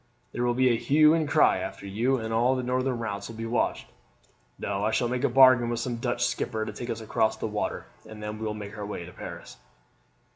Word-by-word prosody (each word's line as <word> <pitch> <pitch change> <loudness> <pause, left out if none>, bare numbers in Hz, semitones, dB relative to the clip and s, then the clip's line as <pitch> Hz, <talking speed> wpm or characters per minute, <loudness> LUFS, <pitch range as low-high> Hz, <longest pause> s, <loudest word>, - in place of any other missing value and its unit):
There 120 - -2
will 120 0 +1
be 130 0 +4
a 115 -2 +1
hue 155 +2 +5
and 160 -2 +1
cry - - +4
after - - -6
you, 115 +7 0
and 110 -1 -4
all 120 +3 +3
the 130 - -2
northern 130 0 0
routes 105 -3 -4
will 115 - -8
be 115 +1 -5
watched. 115 +2 -1 0.7
No, 100 0 -3
I 110 - +2
shall 120 +2 +1
make 125 +1 -2
a - - +3
bargain 130 -2 +6
with 120 -1 -2
some 120 0 -3
Dutch 120 0 -1
skipper 115 -2 -2
to 110 - -6
take 120 +3 -7
us 115 - -3
across 110 0 0
the - - -4
water, 105 - -3 0.2
and 105 -1 -9
then 105 0 -5
we 110 - -4
will 105 - -3
make 105 0 -8
our 105 - -6
way 95 -4 -5
to 90 - -11
Paris." - - -9
115 Hz, 245 wpm, -27 LUFS, 110-125 Hz, 0.7 s, bargain